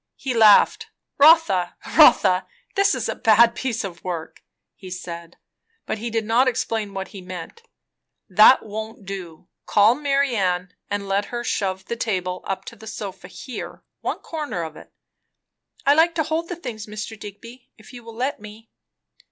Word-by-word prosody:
He 265 - -3
laughed. 220 -3 +5 0.3
"Rotha, 285 - +5 0.2
Rotha! 185 0 +6 0.3
this 395 0 +3
is - - -3
a - - -1
bad 230 0 +5
piece 235 -3 -3
of 175 -4 -8
work!" 170 -3 -6 0.3
he 185 - -12
said; 170 -2 -8 0.5
but 220 - -3
he 235 +2 -4
did 225 -1 -1
not 235 +4 +3
explain 225 -4 -2
what 195 0 -4
he 195 - -10
meant. 180 - -9 0.7
"That 215 +6 +6
won't 220 0 -7
do. 180 -3 -8 0.2
Call 210 +3 +5
Marianne 240 -11 0 0.2
and 205 -1 -3
let 200 +1 0
her 240 +2 -5
shove 190 -4 -2
the 235 - -4
table 185 -6 -3
up 195 0 -3
to - - -9
the 220 - -13
sofa 195 -4 -7
here 250 +6 -8 0.2
one - - -3
corner 300 - -4
of 160 -1 -7
it." - - -14 0.9
"I 280 - +6
like 330 +2 +3
to 320 - +1
hold 320 +2 -2
the 355 - -3
things, 225 -10 -7
Mr. 215 +1 -6
Digby, 230 +5 -11
if 220 +3 -16
you 240 -1 -10
will 230 0 -11
let 260 +4 -2
me." 215 +2 -13
215 Hz, 170 wpm, -22 LUFS, 190-245 Hz, 0.9 s, Rotha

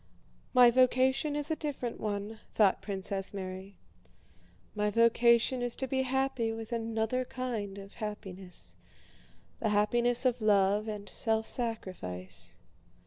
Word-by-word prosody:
"My 245 -1 +8
vocation 260 +3 +3
is 295 +2 -2
a - - +2
different 280 -6 -4
one," 210 +1 -3
thought 205 -3 +3
Princess 195 0 -3
Mary. 190 0 -6 1.0
"My 210 0 0
vocation 235 +3 +4
is 245 -1 -1
to 265 - -3
be 265 +1 0
happy 260 -3 0
with 225 +1 -6
another 225 +2 -1
kind 235 -6 -4
of 195 0 -10
happiness, 190 - -7 0.8
the 220 - 0
happiness 240 +4 +3
of 250 -2 +2
love 205 0 +3
and 210 -2 -5
self 220 -1 0
sacrifice. 95 - -5
220 Hz, 125 wpm, -31 LUFS, 200-245 Hz, 1.0 s, My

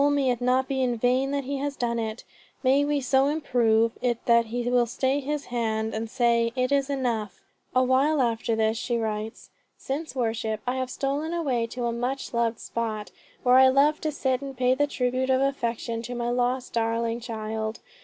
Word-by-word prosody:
Oh 290 - +4
may 280 -3 +2
it 245 0 -3
not 255 +1 +2
be 265 -1 -1
in 245 -2 +1
vain 255 +3 +2
that 280 0 -1
he 275 +2 -3
has 280 +1 -3
done 235 -2 -1
it. 220 +1 -4 0.4
May 270 +2 +4
we 290 0 0
so 265 +1 +3
improve 235 -7 +2
it 240 -2 +1
that 235 -1 +5
he 240 +2 -3
will 245 -1 +3
stay 260 +4 0
his 290 +1 -3
hand 220 -2 -1
and 220 +1 -3
say, 235 -1 +2
'It 255 +1 0
is 280 -1 +2
enough.'" 235 -8 -2 0.4
A 255 - +5
while 270 +4 +3
after 230 -2 +1
this 220 0 +1
she 240 -1 -1
writes: 220 -1 -4 0.3
"Since 285 +2 -4
worship 225 -3 -1
I 250 +1 -1
have 255 -1 -2
stolen 285 +5 -2
away 255 -9 0
to 245 +1 -4
a 235 - 0
much 245 +4 -3
loved 235 -1 0
spot, 220 -3 -4 0.3
where 250 0 +6
I 265 - +8
love 280 +3 +3
to 310 - -1
sit 265 -3 -1
and 270 -2 -7
pay 250 0 +3
the 290 +3 +1
tribute 255 -1 -1
of 260 0 +4
affection 235 -4 -1
to 245 +2 -6
my 240 0 -1
lost, 250 +1 -1
darling 230 0 0
child. 220 -1 -4
245 Hz, 205 wpm, -26 LUFS, 230-270 Hz, 0.4 s, I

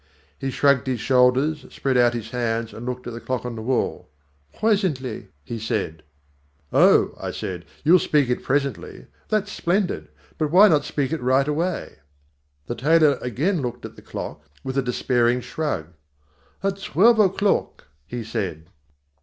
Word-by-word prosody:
He 135 - -2
shrugged 140 0 +2
his 125 -3 -1
shoulders, 130 +5 +3
spread 135 -1 -2
out 120 -1 +4
his 115 -1 -6
hands 115 -2 -2
and 120 +2 -8
looked 125 0 -4
at 120 - -5
the 115 - -7
clock 130 -1 -3
on 120 -1 -4
the 110 - -6
wall. 125 +3 -1 0.5
"Presently," 185 - 0 0.2
he 115 +9 -6
said. 105 -8 -3 0.7
"Oh," - - +5
I - - -4
said, 90 -2 -5 0.2
"you'll 175 +4 +6
speak 150 -4 +2
it 125 - -1
presently. 135 -8 -2 0.2
That's 210 -1 0
splendid. 185 +1 -1 0.3
But 155 -2 +1
why 195 +6 +7
not 150 -3 +3
speak 145 -1 -2
it 160 - -2
right 130 +3 +2
away?" 165 +4 -2 0.7
The 120 - -3
tailor 150 +1 +3
again 150 - 0
looked 125 -1 -5
at - - -9
the - - -14
clock - - -7 0.2
with 130 0 -4
a 135 - +2
despairing 125 -1 +1
shrug. 125 - -3 0.7
"At 195 0 -1
twelve 220 - +4
o'clock," 200 0 +1 0.2
he 120 +5 -5
said. 95 -7 -4
130 Hz, 160 wpm, -23 LUFS, 120-160 Hz, 0.7 s, why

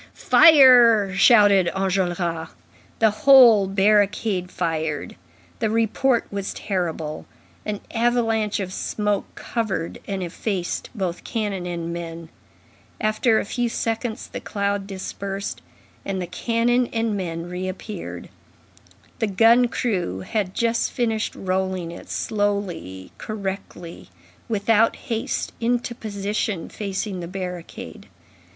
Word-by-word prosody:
"Fire!" 245 - +7
shouted 200 -3 +5
Enjolras. 175 -4 -1 0.5
The 220 -1 +4
whole 235 -4 +7
barricade 200 -1 +2
fired, 160 -4 -3 0.4
the 220 - 0
report 230 +3 +1
was 200 -1 -4
terrible; 165 -6 -3 0.4
an 210 -1 -3
avalanche 225 -3 +1
of 185 -2 -4
smoke 210 0 -1
covered 215 -8 -3
and 195 -2 -3
effaced 180 +1 -3
both 185 -4 -3
cannon 205 -5 -3
and 170 -1 -4
men; 165 -1 -7 0.7
after 215 +1 +2
a - - -3
few 240 +3 -1
seconds, 225 0 -3
the - - -6
cloud 200 -1 -2
dispersed, 195 0 -5 0.4
and 195 -1 -3
the 180 - -2
cannon 235 +6 +1
and 225 -2 -1
men 170 -3 -4
reappeared; 185 +4 -6 0.9
the 225 - +1
gun 230 +5 +5
crew 185 - -2
had 195 - -2
just 230 0 0
finished 225 -4 -1
rolling 185 -2 -2
it 170 - -11
slowly, 200 - -2
correctly, 195 - -6 0.4
without 225 +1 +3
haste, 235 +2 -3
into 240 +1 0
position 205 -4 -3
facing 195 -1 -4
the 170 - -5
barricade. 180 -2 -7
200 Hz, 110 wpm, -23 LUFS, 180-225 Hz, 0.9 s, Fire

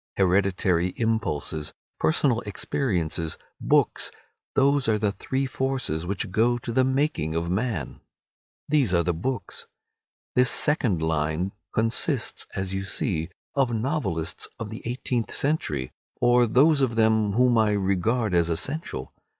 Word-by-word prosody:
Hereditary 90 -2 +2
impulses, 95 -10 -1 0.3
personal 115 - +2
experiences, 90 - -2 0.2
books—those 140 -1 0
are 110 - +3
the 105 -1 0
three 130 +7 -2
forces 130 - -2
which 95 -1 -2
go 120 +4 +2
to 120 0 -5
the 130 +3 +3
making 130 - 0
of 85 +1 -1
man. 105 - -2 0.7
These 140 -11 +2
are 85 - +3
the 85 +1 0
books. 115 +7 -4 0.7
This 125 -1 +4
second 120 - +2
line 80 +3 0 0.2
consists, 115 +1 +1
as 95 0 -3
you 95 - -1
see, 90 -4 -2 0.2
of 130 -4 +1
novelists 105 - -1
of 110 -2 -6
the 110 - -7
eighteenth 120 -1 -2
century, 75 - -1 0.3
or 120 0 +4
those 140 +6 +4
of 125 -4 +1
them 110 -2 +3
whom 125 +2 +4
I 105 -1 +3
regard 100 +3 0
as 85 -1 +3
essential. 85 - -3
110 Hz, 130 wpm, -25 LUFS, 85-125 Hz, 0.7 s, This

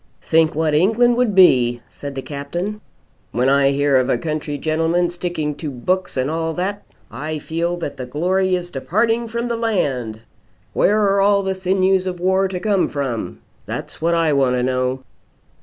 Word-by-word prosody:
"Think 160 -1 +2
what 155 -1 +1
England 225 +9 +3
would 240 -5 +1
be!" 120 -10 +5
said 140 -1 -8
the 135 - -4
Captain. 175 +9 -5 0.5
"When 125 +2 +1
I 140 0 +4
hear 140 0 +2
of 130 -1 +1
a - - +2
country 150 +1 -3
gentleman 165 +4 0
sticking 175 -4 -3
to 155 - -4
books 180 +7 -2
and 130 +1 +1
all 160 +1 -2
that, 200 +3 -2 0.3
I 155 +6 -4
feel 170 +3 -2
that 145 -5 -5
the 130 -1 -6
glory 185 +7 +1
is 175 -1 -5
departing 225 - 0
from 235 +1 -3
the 235 - -1
land. 135 - -1 0.5
Where 200 -1 +3
are 200 0 +3
the 190 0 -1
sinews 190 0 +1
of 180 -1 -4
war 190 +2 +2
to 185 -1 -4
come 200 -1 +1
from? 135 -6 -4 0.3
That's - - -6
what 170 +1 +2
I 165 -2 +2
want 135 -2 +2
to 125 - 0
know." 130 +1 -1
165 Hz, 175 wpm, -20 LUFS, 140-190 Hz, 0.5 s, be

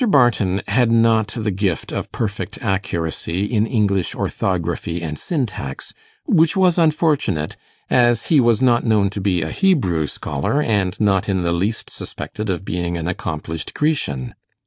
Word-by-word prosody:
Barton 110 - +3
had 120 +3 +3
not 115 -2 +4
the 110 -2 -1
gift 95 -3 -1
of - - -4
perfect 105 -3 -4
accuracy 95 -2 -2
in 110 0 +1
English 100 -6 0
orthography 85 -2 -2
and 75 -2 -3
syntax, 105 - -4 0.3
which 165 +4 +3
was 185 -2 +4
unfortunate, 150 - +1 0.3
as 120 -2 +3
he 155 - +4
was 120 -1 +3
known 120 -2 +4
not 105 -3 +3
to 100 - -4
be 90 -4 +1
a 80 - -4
Hebrew 95 - +2
scholar, 70 - -2
and 100 -9 0
not 100 -2 +2
in 95 -2 0
the 85 0 +1
least 100 +6 -2
suspected 105 -1 -6
of 95 +1 -2
being 85 -1 -2
an 85 0 -3
accomplished 80 -2 -4
Grecian. 70 - -1
100 Hz, 150 wpm, -20 LUFS, 85-120 Hz, 0.3 s, not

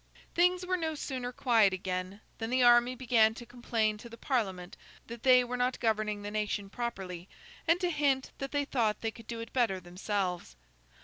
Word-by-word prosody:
Things 360 +1 +3
were 365 0 0
no 320 -2 -2
sooner 255 -4 -4
quiet 225 -7 +3
again, 185 +2 -4 0.2
than 225 0 -3
the 255 0 +2
army 240 +1 +5
began 230 -3 +3
to 240 - -9
complain 225 -3 -1
to 235 - -10
the 230 - -11
Parliament 190 -10 -2 0.3
that 235 0 -9
they 250 0 +6
were 245 0 -4
not 250 +1 0
governing 215 -2 0
the 205 - -5
nation 210 -2 -2
properly, 190 -7 -5 0.4
and 335 +2 +4
to 355 -2 0
hint 280 -4 +1
that 275 0 -4
they 285 -1 0
thought 230 -6 0
they 225 - -1
could 225 0 -14
do 230 -1 -5
it 230 - -9
better 230 -7 +1
themselves. 180 - -3
230 Hz, 190 wpm, -31 LUFS, 205-255 Hz, 0.4 s, they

